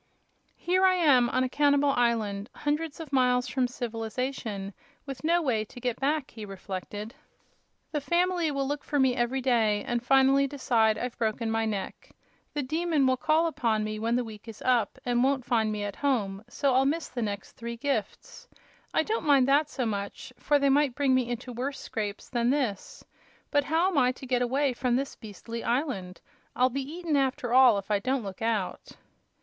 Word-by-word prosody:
"Here 370 Hz, +2 st, +1 dB
I 375 Hz, -1 st, +5 dB
am, 275 Hz, -9 st, +4 dB
on 255 Hz, +1 st, +1 dB
a -, -, +1 dB
cannibal 285 Hz, 0 st, +3 dB
island, 225 Hz, -4 st, 0 dB
hundreds 300 Hz, +1 st, -2 dB
of 310 Hz, -4 st, -8 dB
miles 250 Hz, -1 st, +3 dB
from 255 Hz, -2 st, 0 dB
civilization, 225 Hz, -3 st, -4 dB, 0.3 s
with 275 Hz, -1 st, -7 dB
no 340 Hz, +2 st, +2 dB
way 230 Hz, -7 st, +1 dB
to 245 Hz, -, -12 dB
get 245 Hz, -1 st, -2 dB
back," 290 Hz, +1 st, 0 dB
he 220 Hz, -, -9 dB
reflected. 200 Hz, +2 st, -6 dB, 0.8 s
"The 295 Hz, -, -1 dB
family 350 Hz, +1 st, +1 dB
will 275 Hz, -2 st, -1 dB
look 290 Hz, +1 st, -3 dB
for 290 Hz, -, -2 dB
me 265 Hz, -2 st, +3 dB
every 250 Hz, +2 st, 0 dB
day, 225 Hz, -5 st, +2 dB
and 240 Hz, 0 st, -1 dB
finally 270 Hz, +2 st, +4 dB
decide 235 Hz, -6 st, +1 dB
I've 250 Hz, +1 st, -5 dB
broken 225 Hz, 0 st, -1 dB
my 225 Hz, 0 st, 0 dB
neck. 200 Hz, -3 st, -5 dB, 0.5 s
The 290 Hz, -, -1 dB
Demon 315 Hz, +1 st, +1 dB
will 260 Hz, 0 st, +3 dB
call 310 Hz, +6 st, +2 dB
upon 230 Hz, -9 st, 0 dB
me 215 Hz, 0 st, -4 dB
when 230 Hz, +2 st, 0 dB
the 250 Hz, -, +1 dB
week 220 Hz, -1 st, -11 dB
is 225 Hz, -2 st, -9 dB
up 245 Hz, -3 st, +1 dB
and 245 Hz, 0 st, +2 dB
won't 270 Hz, -2 st, +1 dB
find 225 Hz, -3 st, +1 dB
me 210 Hz, -1 st, -3 dB
at 205 Hz, -1 st, -5 dB
home; 210 Hz, -8 st, -1 dB
so 275 Hz, +2 st, +1 dB
I'll 260 Hz, +1 st, +4 dB
miss 310 Hz, +3 st, 0 dB
the 245 Hz, -, -4 dB
next 200 Hz, -3 st, -4 dB
three 235 Hz, 0 st, -7 dB
gifts. 280 Hz, +3 st, -4 dB, 0.5 s
I -, -, +4 dB
don't 445 Hz, +1 st, -2 dB
mind 275 Hz, -3 st, +5 dB
that 290 Hz, +2 st, +3 dB
so 260 Hz, -4 st, -2 dB
much, 205 Hz, +4 st, -4 dB
for 290 Hz, -, +3 dB
they 280 Hz, -1 st, +2 dB
might 280 Hz, -2 st, +3 dB
bring 275 Hz, -2 st, +2 dB
me 255 Hz, -2 st, +1 dB
into 245 Hz, +1 st, -5 dB
worst 265 Hz, +4 st, -4 dB
scrapes 205 Hz, -2 st, -4 dB
than 240 Hz, -1 st, 0 dB
this. 255 Hz, -8 st, -2 dB, 0.5 s
But 290 Hz, -1 st, +2 dB
how 330 Hz, +5 st, +2 dB
am 335 Hz, -7 st, +2 dB
I 250 Hz, -1 st, +3 dB
to 265 Hz, -, -11 dB
get 250 Hz, -1 st, 0 dB
away 265 Hz, +2 st, +1 dB
from 245 Hz, 0 st, 0 dB
this 275 Hz, +2 st, -2 dB
beastly 230 Hz, +2 st, -8 dB
island? 235 Hz, -, -2 dB, 0.3 s
I'll 255 Hz, +1 st, +3 dB
be 275 Hz, +3 st, -2 dB
eaten, 335 Hz, -2 st, -2 dB
after 260 Hz, -3 st, 0 dB
all, 255 Hz, -4 st, +7 dB
if 200 Hz, +1 st, -5 dB
I 205 Hz, -, +3 dB
don't 260 Hz, +3 st, -1 dB
look 195 Hz, 0 st, -8 dB
out!" 220 Hz, -5 st, -2 dB
250 Hz, 195 wpm, -28 LUFS, 225-280 Hz, 0.8 s, all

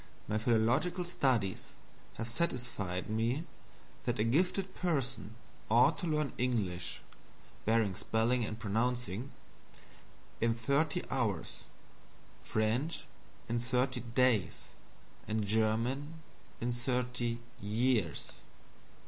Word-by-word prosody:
My 110 Hz, +1 st, +1 dB
philological 120 Hz, -, +2 dB
studies 130 Hz, -, 0 dB, 0.4 s
have 115 Hz, -, -3 dB
satisfied 120 Hz, -, -1 dB
me 115 Hz, +7 st, 0 dB, 0.6 s
that -, -, 0 dB
a 105 Hz, -, +2 dB
gifted 180 Hz, -, +1 dB
person 135 Hz, -9 st, -1 dB, 0.3 s
ought 130 Hz, +7 st, +5 dB
to 175 Hz, -, -2 dB
learn 150 Hz, -3 st, +1 dB
English 100 Hz, -9 st, -1 dB, 0.6 s
(barring 110 Hz, -3 st, +3 dB
spelling 115 Hz, +5 st, +1 dB
and 110 Hz, -1 st, -3 dB
pronouncing) 120 Hz, +2 st, -1 dB, 1.1 s
in 115 Hz, 0 st, +2 dB
thirty 140 Hz, +8 st, +1 dB
hours, 110 Hz, -10 st, -1 dB, 0.8 s
French 115 Hz, +9 st, 0 dB, 0.4 s
in 120 Hz, +1 st, 0 dB
thirty 125 Hz, +1 st, +1 dB
days, 120 Hz, -3 st, +1 dB, 0.6 s
and 110 Hz, 0 st, 0 dB
German 115 Hz, +8 st, +1 dB, 0.4 s
in 120 Hz, +1 st, 0 dB
thirty 120 Hz, -1 st, -1 dB, 0.2 s
years. 105 Hz, -, 0 dB
120 Hz, 95 wpm, -33 LUFS, 110-135 Hz, 1.1 s, ought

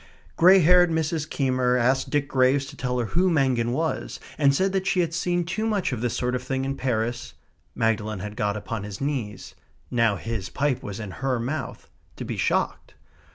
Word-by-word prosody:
Grey 185 Hz, +3 st, +7 dB
haired 175 Hz, +2 st, +6 dB
Mrs. 160 Hz, -1 st, -1 dB
Keymer 130 Hz, -2 st, +1 dB
asked 130 Hz, +2 st, +1 dB
Dick 145 Hz, -1 st, 0 dB
Graves 130 Hz, +1 st, +2 dB
to -, -, -10 dB
tell 125 Hz, 0 st, -2 dB
her 120 Hz, -, 0 dB
who 185 Hz, +2 st, +3 dB
Mangin 130 Hz, -7 st, +1 dB
was, 160 Hz, +5 st, -2 dB, 0.2 s
and 140 Hz, -2 st, +4 dB
said 190 Hz, +5 st, +1 dB
that 190 Hz, 0 st, -1 dB
she 185 Hz, -, +2 dB
had 165 Hz, -1 st, -2 dB
seen 175 Hz, +1 st, 0 dB
too 215 Hz, +7 st, -2 dB
much 205 Hz, -8 st, 0 dB
of 115 Hz, -, -4 dB
this 120 Hz, -1 st, -1 dB
sort 125 Hz, 0 st, -1 dB
of 125 Hz, -, -1 dB
thing 130 Hz, +1 st, -2 dB
in 135 Hz, 0 st, -2 dB
Paris 120 Hz, -2 st, -2 dB, 0.4 s
(Magdalen 110 Hz, -1 st, 0 dB
had 105 Hz, +2 st, -6 dB
got 105 Hz, -2 st, -1 dB
upon 110 Hz, +1 st, -5 dB
his 105 Hz, -1 st, -7 dB
knees; 130 Hz, -8 st, -4 dB, 0.4 s
now 115 Hz, -4 st, +2 dB
his 105 Hz, -2 st, -4 dB
pipe 140 Hz, -3 st, 0 dB
was 100 Hz, 0 st, -6 dB
in 105 Hz, -4 st, -6 dB
her 130 Hz, -3 st, 0 dB
mouth) 135 Hz, +7 st, -4 dB, 0.3 s
to -, -, -6 dB
be -, -, -4 dB
shocked. -, -, -1 dB
130 Hz, 200 wpm, -25 LUFS, 115-160 Hz, 0.4 s, Grey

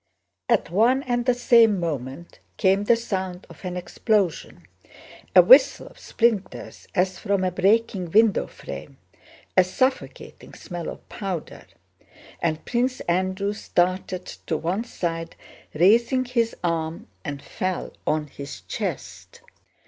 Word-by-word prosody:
At 230 Hz, -7 st, +2 dB
one 240 Hz, +8 st, +3 dB
and 245 Hz, -1 st, -1 dB
the 250 Hz, -, +4 dB
same 230 Hz, -4 st, +5 dB
moment 150 Hz, -1 st, -5 dB, 0.2 s
came 195 Hz, +1 st, +2 dB
the 235 Hz, -, +5 dB
sound 190 Hz, -5 st, -4 dB
of -, -, -15 dB
an 180 Hz, -1 st, -4 dB
explosion, 195 Hz, 0 st, -1 dB, 0.7 s
a -, -, +10 dB
whistle -, -, +6 dB
of -, -, -15 dB
splinters 225 Hz, -5 st, -1 dB
as 185 Hz, 0 st, +1 dB
from 200 Hz, -3 st, 0 dB
a 185 Hz, -, +1 dB
breaking 195 Hz, 0 st, +1 dB
window 215 Hz, +3 st, +3 dB
frame, -, -, -9 dB, 0.6 s
a 185 Hz, -, +7 dB
suffocating 260 Hz, +9 st, -3 dB
smell 175 Hz, -2 st, -6 dB
of -, -, -10 dB
powder, 190 Hz, -6 st, -6 dB, 0.7 s
and 160 Hz, -1 st, -1 dB
Prince 250 Hz, +2 st, -1 dB
Andrew 185 Hz, +3 st, -1 dB
started 185 Hz, -2 st, -1 dB
to 160 Hz, -, -4 dB
one 185 Hz, +9 st, -2 dB
side, 165 Hz, -6 st, -4 dB, 0.4 s
raising 230 Hz, -, +4 dB
his 235 Hz, -2 st, 0 dB
arm, 165 Hz, -1 st, -2 dB, 0.2 s
and 145 Hz, -2 st, -5 dB
fell 185 Hz, -1 st, -4 dB
on 155 Hz, 0 st, +1 dB
his 140 Hz, 0 st, -9 dB
chest. -, -, -6 dB
190 Hz, 125 wpm, -24 LUFS, 175-230 Hz, 0.7 s, a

